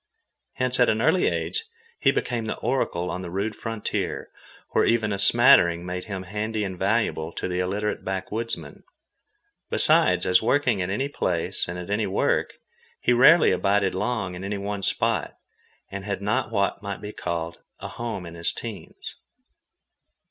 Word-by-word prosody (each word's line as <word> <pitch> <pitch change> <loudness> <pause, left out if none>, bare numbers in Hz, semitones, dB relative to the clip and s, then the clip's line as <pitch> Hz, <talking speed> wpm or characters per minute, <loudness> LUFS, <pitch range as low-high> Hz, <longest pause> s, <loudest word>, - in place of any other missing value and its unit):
Hence 125 0 0
at 125 - +5
an 110 - +1
early 160 +9 +3
age 450 0 -2 0.3
he - - +4
became 120 -2 -2
the - - -3
oracle 90 -9 -1
on 90 - -4
the 90 - -6
rude 100 +4 -2
frontier, 115 -2 -4 0.4
where - - +3
even 110 -3 +2
a 100 - -3
smattering 95 -6 +5
made 90 0 -4
him 95 -3 -5
handy 105 +3 -3
and 95 -2 -4
valuable 95 -4 0
to - - -3
the 90 0 -2
illiterate 100 +3 -2
backwoodsmen. 95 -3 -3 0.9
Besides, - - +4
as 90 0 +4
working 120 -3 +2
at 90 - -2
any 120 +8 -1
place 90 - -2
and 85 +1 -5
at 90 +2 -6
any 105 0 +1
work, 95 - 0 0.4
he 125 - +2
rarely 150 +7 +7
abided 100 -1 +2
long 105 -1 -2
in 90 +1 -7
any 100 +1 -3
one 100 0 -4
spot, - - 0 0.5
and 100 0 -5
had 100 0 -3
not 105 +2 0
what 100 -2 0
might 100 -2 -5
be 105 0 -7
called 85 0 -4 0.2
a - - -6
home 115 -6 -5
in 85 - -9
his 85 0 -2
teens. - - -8
100 Hz, 165 wpm, -25 LUFS, 90-115 Hz, 0.9 s, rarely